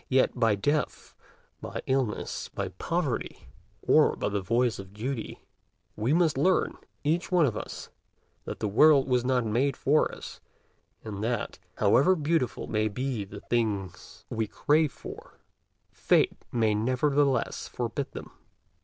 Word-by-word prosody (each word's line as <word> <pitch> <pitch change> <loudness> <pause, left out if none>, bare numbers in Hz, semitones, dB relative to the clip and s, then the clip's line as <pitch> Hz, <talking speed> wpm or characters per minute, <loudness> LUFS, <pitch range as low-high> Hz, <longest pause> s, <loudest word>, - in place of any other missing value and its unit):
Yet, 130 0 +3
by 115 -4 +2
death, 145 +8 -1 0.5
by - - -6
illness, 130 -5 -1
by - - -4
poverty, - - -3 0.3
or - - +4
by - - -2
the 100 -1 -1
voice 115 +4 +1
of 95 0 -10
duty, 120 +1 -5 0.5
we 110 +5 -1
must 160 -4 +3
learn, 185 +5 +2 0.3
each 165 +6 0
one 175 -3 +5
of 115 -6 -1
us, - - -7 0.5
that - - -6
the 110 - +1
world 140 +7 +5
was 125 -2 +2
not 125 -2 +1
made 125 +5 +1
for 150 +3 +2
us, - - -10 0.6
and 105 -2 -5
that, 120 0 -2 0.2
however 135 - +4
beautiful 155 -4 0
may 110 0 0
be 125 +1 -2
the 100 +1 -10
things 100 -7 -3
we 110 -1 -2
crave 150 +4 +2
for, - - -11 0.5
Fate - - +2 0.2
may 110 -3 +2
nevertheless 130 +4 +1
forbid 120 +3 -3
them. - - -8
125 Hz, 140 wpm, -28 LUFS, 110-145 Hz, 0.6 s, one